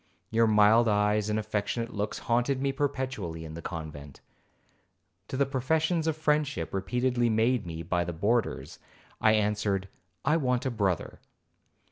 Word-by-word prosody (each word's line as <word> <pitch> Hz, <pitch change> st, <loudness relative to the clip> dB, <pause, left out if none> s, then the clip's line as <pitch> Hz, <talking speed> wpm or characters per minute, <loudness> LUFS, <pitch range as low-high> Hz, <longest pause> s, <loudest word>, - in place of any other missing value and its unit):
Your 115 Hz, +1 st, +4 dB
mild 110 Hz, +2 st, +5 dB
eyes 105 Hz, 0 st, +2 dB
and 105 Hz, -, 0 dB
affectionate 110 Hz, +2 st, -2 dB
looks 105 Hz, 0 st, -2 dB
haunted 120 Hz, +3 st, +1 dB
me 135 Hz, 0 st, 0 dB
perpetually 130 Hz, -, -3 dB
in 80 Hz, -, -8 dB
the 85 Hz, -, -7 dB
convent. 75 Hz, -5 st, -7 dB, 1.1 s
To 130 Hz, -, -4 dB
the 140 Hz, -, +3 dB
professions 160 Hz, +5 st, 0 dB
of 160 Hz, -1 st, 0 dB
friendship 150 Hz, -2 st, 0 dB
repeatedly 120 Hz, +5 st, 0 dB
made 110 Hz, -1 st, +1 dB
me 85 Hz, 0 st, -5 dB
by 85 Hz, +1 st, 0 dB
the 85 Hz, -, -4 dB
boarders, 105 Hz, +8 st, -1 dB, 0.4 s
I 110 Hz, -, +5 dB
answered, 105 Hz, -2 st, 0 dB, 0.4 s
'I 155 Hz, +3 st, +4 dB
want 125 Hz, -5 st, 0 dB
a 130 Hz, -, 0 dB
brother.' 100 Hz, -6 st, -1 dB
110 Hz, 145 wpm, -28 LUFS, 100-130 Hz, 1.1 s, mild